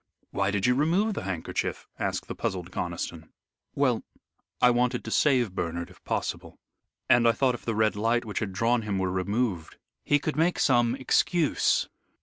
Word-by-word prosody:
"Why 100 0 0
did 100 -1 0
you 125 - +4
remove 170 - +2
the 95 - -5
handkerchief?" 90 -4 -3
asked - - -2
the - - -4
puzzled 90 -1 -4
Conniston. 85 -2 -4 0.5
"Well, - - +2 0.6
I 125 - +6
wanted 125 0 +1
to 110 - -6
save 125 -9 +3
Bernard 85 -2 -3
if - - -20
possible, - - -3 0.5
and 120 -1 +5
I 115 - +5
thought 130 0 +2
if 120 - -8
the 115 - -1
Red 110 -1 +2
Light 115 +3 +1
which 105 - -3
had 100 -3 -3
drawn 115 +5 +1
him 105 -3 -2
were 95 -1 0
removed, 95 -2 -2 0.3
he 145 - +3
could 150 +1 -3
make 170 +3 +2
some 120 -2 +3
excuse. 150 +4 +2
115 Hz, 175 wpm, -27 LUFS, 95-125 Hz, 0.6 s, I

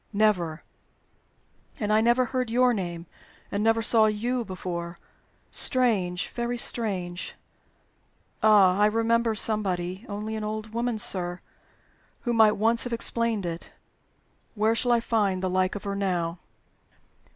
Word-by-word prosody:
"Never." 180 -7 +1 1.2
"And 210 -1 0
I 215 - +4
never 240 +2 +3
heard 255 -1 -2
your 250 +1 +3
name, 175 -5 -4 0.5
and 205 0 -1
never 225 0 +2
saw 220 -1 +4
you 235 +4 -1
before. 175 -3 -6 0.5
Strange! 200 -8 +3
very 240 0 -3
strange! 185 -7 -2 1.1
Ah! 200 -3 +5
I 210 - +5
remember 230 +1 +1
somebody 190 -3 0
only 210 +2 -4
an 215 - -4
old 215 +1 -5
woman, 235 0 -1
sir 180 -3 -2 0.8
who 240 - -1
might 220 -2 +5
once 225 +2 +2
have 245 - -4
explained 230 -3 0
it. 170 0 -6 0.8
Where 215 +1 +2
shall 240 +2 0
I 235 -1 +3
find 200 -5 0
the 185 - -1
like 185 +1 0
of 205 - -6
her 200 -1 -3
now?" 175 -3 -2
215 Hz, 135 wpm, -26 LUFS, 185-230 Hz, 1.2 s, Ah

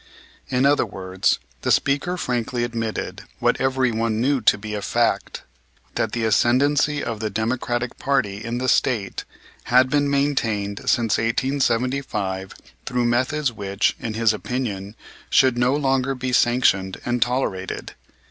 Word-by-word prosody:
In 125 +1 +2
other 145 +1 +4
words, 95 -3 -1 0.2
the - - -2
speaker 145 +6 +1
frankly 120 -4 -2
admitted, 115 -2 -3 0.2
what - - +1
everyone 120 -4 +1
knew 135 +2 +1
to 105 - +4
be 105 +1 -6
a 105 - -3
fact, - - 0 0.5
that - - -1
the 115 -2 -1
ascendency 140 +6 +2
of 115 -2 -4
the 110 0 -2
Democratic 120 +2 -2
party 110 -7 0
in 115 +1 -3
the 130 +1 -2
State 115 -6 +1 0.4
had 130 +1 +4
been 145 -1 +2
maintained 115 -8 0
since 115 -4 +2
1875 115 -5 -1 0.3
through 125 -1 0
methods 130 +4 +1
which, 100 -1 0
in 110 -2 -4
his 115 -1 +3
opinion, 105 -4 -4 0.3
should 130 -2 +4
no 125 +3 +3
longer 135 -2 +1
be 125 0 -3
sanctioned 120 -7 +2
and 120 0 -1
tolerated. 120 -7 -2
120 Hz, 140 wpm, -22 LUFS, 110-130 Hz, 0.5 s, other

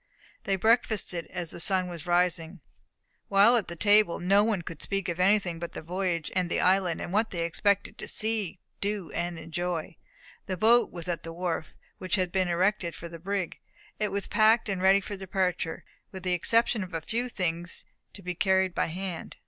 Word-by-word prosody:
They 195 - +1
breakfasted 215 -4 +1
as 175 -3 -4
the - - -7
sun 185 +1 +2
was 170 -1 -8
rising. 175 0 +1 0.7
While 205 +5 +6
at 230 - +1
table 205 -3 +4
no 195 +3 +4
one 210 -5 0
could 165 -2 -8
speak 195 -2 -2
of 170 0 -3
anything 185 -3 +2
but 170 0 -6
the - - -7
voyage 175 -1 -2
and 180 -2 +1
the - - 0
island, 185 -2 +2
and 175 - -5
what 220 +2 +2
they 170 -2 -2
expected 200 +4 0
to - - -6
see, 215 -5 -1 0.2
do, 200 -4 -3
and 175 -1 -3
enjoy. 165 +1 -4 0.5
The 185 -2 -2
boat 235 +5 +5
was 175 0 -7
at 175 -2 -2
the 165 - -7
wharf, 165 -2 -3 0.2
which 185 +1 0
had 185 -3 0
been 185 -1 +1
erected 175 0 +1
for 170 - -8
the 165 0 -9
brig. 195 0 -3 0.4
It 210 - +1
was 200 0 -2
packed, 220 +1 +4
and 190 -2 -2
ready 195 +1 +5
for 205 +1 -6
departure, 185 -3 -2 0.3
with 190 -2 -8
the 180 -1 +1
exception 225 +4 +2
of 180 -2 -8
a 165 - -2
few 235 +9 -2
things 175 -4 -2 0.3
to 200 - -12
be 180 0 -3
carried 190 0 +2
by - - 0
hand. 180 0 -6
185 Hz, 195 wpm, -28 LUFS, 170-200 Hz, 0.7 s, While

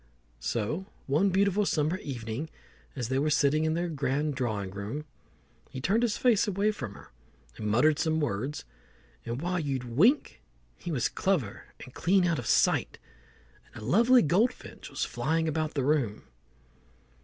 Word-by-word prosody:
So 120 - -2 0.2
one 155 +9 +2
beautiful 200 +2 +2
summer 160 -2 0
evening, 125 +2 -5 0.5
as 125 -4 -3
they 130 +1 +1
were 150 +2 +1
sitting 150 +1 +3
in 160 0 +1
their 175 +1 -1
grand 145 -1 -1
drawing 110 -7 -2
room, 105 +10 -5 0.6
he 130 - -7
turned 200 - +1
his 235 -4 +1
face 235 -6 +3
away 205 +2 +1
from 120 - -7
her - - -14 0.4
and 105 - -5
muttered 145 +8 +3
some 160 -1 +1
words, 145 +1 -2 0.6
and 120 +6 -3
while 180 +1 0
you'd 135 -5 -2
wink 170 - +2 0.3
he 175 - -6
was 130 -6 +1
clever 155 - -1 0.2
and 125 - -14
clean 180 +2 +2
out 165 -3 +1
of 120 - -6
sight, - - +2 0.8
and 110 - -8
a - - -6
lovely 235 - +5
goldfinch 210 - 0
was - - -2
flying 160 +1 -1
about 155 0 -2
the 135 -3 0
room. 135 -8 0
150 Hz, 160 wpm, -29 LUFS, 125-180 Hz, 0.8 s, lovely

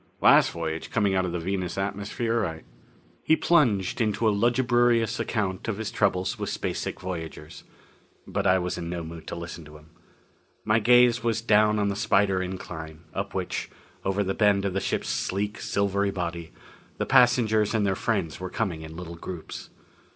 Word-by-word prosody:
Last - - +6
voyage, 80 -1 -4
coming 100 -3 +1
out 95 -1 +2
of 90 - -3
the 90 - -2
Venus 90 0 -3
atmosphere 100 -2 -2 0.3
" - - -32
He 160 - +4
plunged 125 - +2
into 110 +1 +1
a - - +5
lugubrious 120 +1 +2
account 100 -4 -2
of 110 -3 -2
his 110 -2 -4
troubles 90 0 0
with - - -3
space - - -3
sick - - -4
voyagers. 80 -4 -7 0.6
But - - -1
I 95 0 +5
was 90 -1 -2
in 85 -1 -5
no 85 -1 -4
mood 80 0 -9
to - - -4
listen 85 0 -7
to 75 +1 -12
him. 75 +1 -20 0.7
My 110 +1 +3
gaze 120 +1 +5
was 115 -1 +1
down 105 -1 +3
on 100 -1 +1
the 100 - -2
spider 100 -2 +2
incline, 80 -4 -6
up - - -4
which, - - -3 0.3
over 95 +1 0
the 95 0 -1
bend 100 -2 +3
of 95 - -1
the 95 - 0
ship's - - -2
sleek, 105 +2 -2
silvery 100 0 0
body, 85 -3 -4 0.5
the - - -1
passengers 110 -3 +4
and 105 -2 +2
their 95 - +2
friends 100 -9 -1
were 95 0 -5
coming 90 -8 -2
in 80 0 -9
little 85 -1 -7
groups. 85 -1 -8
100 Hz, 180 wpm, -26 LUFS, 85-110 Hz, 0.7 s, Last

